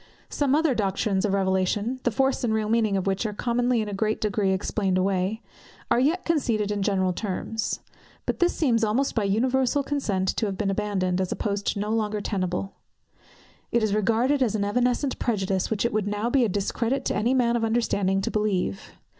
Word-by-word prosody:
Some 285 -2 +1
other 310 -2 +3
Doctrines 200 -1 0
of 200 - 0
Revelation, 195 +5 0
the 245 - +1
force 265 +4 0
and 235 - +1
real 215 -1 0
meaning 220 -3 +2
of 190 - -2
which 195 +1 0
are 210 - -5
commonly 245 +1 +1
in - - -6
a 205 - -5
great 215 +2 0
degree 205 -2 0
explained 190 0 0
away, 190 +3 0 0.5
are - - +4
yet 315 +8 +1
conceded 230 -10 0
in 205 -1 -1
general 190 -2 +1
terms. 215 +3 -3 0.4
But - - -2
this 350 0 +4
seems 235 -7 +1
almost 230 +6 +1
by 220 -3 0
universal 255 +6 +1
consent 210 -10 -1
to 220 - +1
have 195 -2 -4
been 200 -1 0
abandoned, 190 -3 0
as 185 - -2
a - - 0
post 205 -1 -2
no 210 +1 -2
longer 215 -1 0
tenable. 195 -2 -2 1.0
It 235 - +2
is 215 -2 +1
regarded 230 +7 +2
as 230 -5 +2
an 200 -1 0
evanescent 250 +5 0
prejudice, 195 -5 0
which 220 0 0
it 235 - 0
would 210 -1 0
now 210 +3 -1
be 270 -1 +4
a - - 0
discredit 230 +7 -1
to - - 0
any 235 +5 +1
man 240 -2 +2
of 235 - 0
understanding 205 -4 +1
to - - -2
believe. 195 - -1
215 Hz, 200 wpm, -25 LUFS, 195-240 Hz, 1.0 s, are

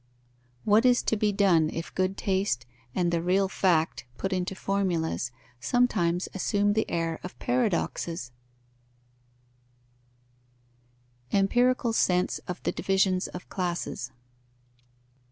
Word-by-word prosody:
What 215 +2 +4
is 250 -1 +4
to - - +1
be 210 0 +1
done 185 -6 +3
if 165 - -6
good 185 +1 0
taste 190 -11 0 0.3
and 175 -2 +1
the 170 -1 +1
real 190 +3 +2
fact, 175 -4 +1
put 195 0 -2
into 185 +1 -2
formulas, 180 -9 -1 0.3
sometimes 180 - +1
assume 205 +2 +1
the 220 +1 0
air 165 -1 -1
of 180 - -8
paradoxes? 175 - -1 3.0
_Empirical 245 +5 +2
sense 180 -4 +2
of 180 - -5
the - - +1
divisions 190 -1 +1
of 180 - -9
classes. 175 -8 -3
190 Hz, 110 wpm, -27 LUFS, 170-205 Hz, 3.0 s, What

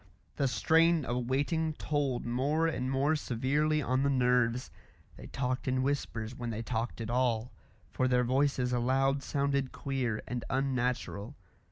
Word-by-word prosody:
The 140 - +2
strain 160 +6 +3
of 120 0 -2
waiting 155 +4 0
told 145 -5 -1
more 140 +7 +1
and 130 -6 -1
more 140 +4 +2
severely 150 +4 0
on 130 0 +1
the 140 - +2
nerves; 125 -2 +2 0.4
they - - -10
talked 130 -1 -2
in 130 0 +1
whispers 125 -5 -2
when 120 -1 -5
they 115 0 -4
talked 115 0 -3
at 115 0 -4
all, 125 -1 +1 0.4
for 130 - +1
their 125 -1 +3
voices 130 0 +1
aloud 135 +3 +2
sounded 140 -2 0
queer 130 -5 -2
and 125 -1 -3
unnatural. 125 -3 -1
130 Hz, 150 wpm, -31 LUFS, 125-140 Hz, 0.4 s, strain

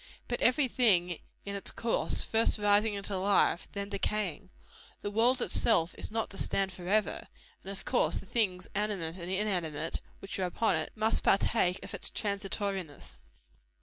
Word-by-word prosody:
But 240 - -3
every 260 +3 +4
thing 180 -9 +2 0.3
in 200 0 -4
its 200 - -2
course; 235 - 0
first 225 0 +2
rising 205 +1 +3
into 200 0 -2
life, 195 -2 +2
then 200 0 -3
decaying. 200 -2 -2 0.5
The 205 - -3
world 235 +4 +4
itself 175 -8 +2
is - - -7
not 225 0 -2
to 195 - -6
stand 195 -1 0
forever; 190 +4 -1 0.4
and 195 - -8
of 195 -1 -8
course - - +1
the - - -6
things 185 -4 0
animate 195 -5 -1
and 175 -1 -5
inanimate 180 -6 -1 0.2
which 195 0 -5
are 185 - +1
upon 190 +2 +1
it, 160 - -2
must 220 +1 +2
partake 195 -2 +2
of - - -9
its - - -1
transitoriness." 195 - -3
200 Hz, 160 wpm, -30 LUFS, 180-215 Hz, 0.5 s, every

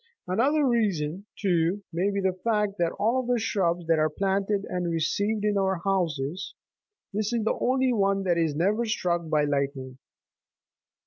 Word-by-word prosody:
Another 275 +11 +2
reason, 195 - 0
too, 180 0 +1
may 180 +4 +1
be 200 0 -1
the 190 -1 +1
fact, 210 -3 0
that 170 - +3
of - - -14
all 230 +5 +2
the 245 -1 0
shrubs 180 -6 0
that 165 -1 +2
are 155 0 +3
planted 195 +4 0
and 180 -1 -2
received 205 +6 0
in 205 -1 +2
our 190 -2 0
houses, 175 -4 -1 0.6
this 210 +1 -1
is 235 -2 0
the 220 - +1
only 260 0 +2
one 195 -2 +1
that 180 -2 +2
is 160 -3 0
never 200 +8 +1
struck 175 -7 -1
by 150 -1 +2
lightning. 140 -2 -2
195 Hz, 170 wpm, -26 LUFS, 165-215 Hz, 0.6 s, that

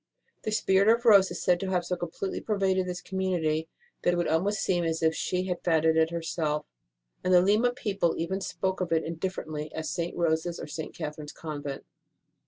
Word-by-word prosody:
The 215 - -1
spirit 195 -2 +3
of 235 +2 +3
Rose 200 -4 +7
is - - -5
said 180 -1 +3
to 195 - -3
have 180 -2 0
so 180 - -1
completely 175 +2 -4
pervaded 190 -3 +1
this 180 0 -4
community 170 -4 -1 0.3
that 175 - +2
it - - -2
would 175 - +1
almost 195 +6 +1
seem 175 -2 +1
as 165 0 -1
if 160 0 +4
she 180 +2 -1
had 180 -2 -3
founded 160 -2 +3
it 160 0 +4
her 170 -1 -4
self, 150 -2 -1 0.6
and 185 - +1
the 180 - +8
Lima 210 +6 +3
people 200 -8 -1
even 190 +4 -2
spoke 190 0 -2
of 180 - -2
it 165 -1 +2
indifferently 160 -3 -4
as 160 -1 -3
St. 170 0 -3
Rose 160 -1 +1
s 170 - -4
or - - -5
St. 155 +1 -6
Catherine 150 -2 -5
s - - -7
Convent. 145 -3 -6
175 Hz, 210 wpm, -28 LUFS, 160-190 Hz, 0.6 s, the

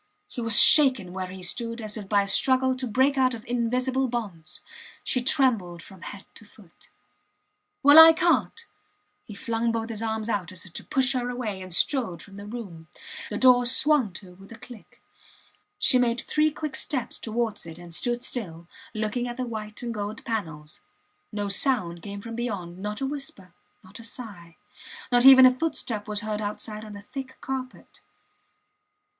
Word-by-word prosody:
He 245 - -7
was 225 -2 +7
shaken 260 -12 +6
where 185 -1 -4
he 185 0 -10
stood 230 +6 0
as 215 -2 -4
if 205 -3 -8
by 205 -1 +3
a - - -7
struggle 260 +5 +2
to 255 0 -4
break 265 +5 +1
out 255 -2 +2
of 225 - -12
invisible 250 +2 -1
bonds. 205 -10 -6 0.4
She 250 - -1
trembled 230 - 0
from 190 -3 -15
head 195 +2 -9
to - - -13
foot. 205 -4 -20 0.9
Well, 290 +3 +9
I 320 0 +11
cant! 345 +7 0 0.6
He 210 - -10
flung 230 +2 -2
both 225 0 -3
his 220 -1 -4
arms 220 -1 -3
out, 200 -6 -2
as 185 - -6
if 175 - -14
to - - -7
push 265 0 0
her 245 -1 -2
away, 225 -6 -5
and 185 0 -10
strode 185 - 0
from 200 - -15
the 200 +1 -10
room. 195 -8 -9 0.4
The 210 - -4
door 250 -1 +5
swung 255 -2 +3
to 180 0 -9
with 195 +3 -17
a 230 - -10
click. 230 -2 -15 0.8
She 255 - +4
made 240 -1 +1
three 305 0 +1
quick 305 -2 -6
steps 265 -2 -2
towards 220 -4 -3
it 165 0 -9
and 175 -1 -12
stood 240 +8 -2
still, 170 -8 -5 0.3
looking 220 +3 -2
at 240 +1 -7
the 255 - -3
white 215 -1 -7
and 235 -1 -4
gold 210 0 -6
panels. 160 -9 -5 0.5
No 205 -1 -3
sound 195 -6 +1
came 200 +2 -8
from 230 +1 -8
beyond, 195 -7 -5
not 210 +5 -5
a - - 0
whisper, 270 - -7 0.3
not 185 +4 -13
a - - -11
sigh; 200 -8 -10 0.5
not 245 +1 +5
even 260 -1 +10
a 255 - +6
footstep 245 -7 -4
was 210 0 -2
heard 215 -1 -4
outside 210 +1 -5
on 215 -1 -10
the 200 0 -10
thick 265 +2 -9
carpet. 260 -1 -7
225 Hz, 185 wpm, -25 LUFS, 200-255 Hz, 0.9 s, I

